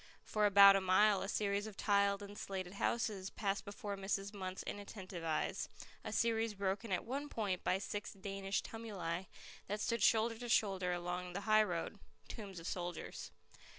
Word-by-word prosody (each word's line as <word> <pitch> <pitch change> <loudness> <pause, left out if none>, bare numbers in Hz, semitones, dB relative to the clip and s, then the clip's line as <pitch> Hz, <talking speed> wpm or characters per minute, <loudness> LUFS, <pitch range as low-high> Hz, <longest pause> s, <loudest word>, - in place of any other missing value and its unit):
For 210 -1 +2
about 200 0 +9
a 195 - +3
mile 190 +2 +4
a 195 - -3
series 205 -1 0
of 210 - -10
tiled 200 -1 +2
and 200 0 -9
slated 190 -3 -5
houses 200 -2 -1
passed 200 -1 -1
before 205 0 -5
Mrs. 195 0 -2
Munt's 190 -3 -5
inattentive 190 -4 -6
eyes, 160 -1 -1 0.3
a - - -4
series 225 -2 +1
broken 195 +2 -2
at 180 - 0
one 280 +4 -3
point 200 -7 -2
by 185 - +2
six 205 +1 -4
Danish 195 0 -2
tumuli 190 -6 -4 0.4
that 210 +1 -2
stood 230 +1 0
shoulder 225 +2 +3
to 240 -1 -5
shoulder 195 -5 +2
along 175 0 -3
the 200 - -3
highroad, 210 -3 +2 0.3
tombs 200 -5 -7
of 165 - -10
soldiers. 175 - -4
200 Hz, 165 wpm, -37 LUFS, 185-215 Hz, 0.4 s, about